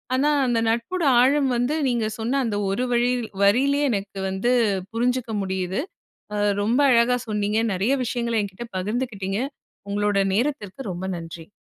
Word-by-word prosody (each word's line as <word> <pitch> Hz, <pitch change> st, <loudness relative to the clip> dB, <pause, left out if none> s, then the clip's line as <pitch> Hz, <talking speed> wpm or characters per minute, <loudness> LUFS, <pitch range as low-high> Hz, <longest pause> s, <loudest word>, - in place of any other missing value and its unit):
ஆனா 280 Hz, +3 st, +2 dB, 0.2 s
அந்த 240 Hz, -2 st, +1 dB
நட்போட 235 Hz, +11 st, -1 dB, 0.2 s
ஆழம் 275 Hz, +1 st, +3 dB
வந்து 245 Hz, +5 st, 0 dB
நீங்க 235 Hz, -3 st, 0 dB
சொன்ன 235 Hz, +5 st, 0 dB
அந்த 215 Hz, -3 st, -1 dB
ஒரு 195 Hz, +6 st, 0 dB
வழி 240 Hz, 0 st, +2 dB, 0.3 s
வரியிலே 270 Hz, +8 st, +3 dB
எனக்கு 200 Hz, -3 st, -3 dB
வந்து 190 Hz, +6 st, 0 dB, 0.4 s
புரிஞ்சுக்க 240 Hz, 0 st, 0 dB
முடியுது. 190 Hz, 0 st, -2 dB, 0.6 s
அ -, -, -1 dB, 0.2 s
ரொம்ப 230 Hz, +6 st, +1 dB
அழகா 235 Hz, +1 st, +4 dB
சொன்னீங்க, 210 Hz, 0 st, 0 dB
நெறைய 200 Hz, +8 st, +1 dB
விஷயங்கள 235 Hz, -1 st, -1 dB
என்கிட்ட 200 Hz, +4 st, -7 dB
பகிர்ந்துக்கிட்டீங்க. 205 Hz, -1 st, -2 dB, 0.5 s
உங்களோட 205 Hz, -1 st, +1 dB
நேரத்திற்கு 250 Hz, -2 st, -2 dB
ரொம்ப 180 Hz, +2 st, -5 dB
நன்றி. 165 Hz, -1 st, -9 dB
230 Hz, 140 wpm, -23 LUFS, 200-250 Hz, 0.6 s, அழகா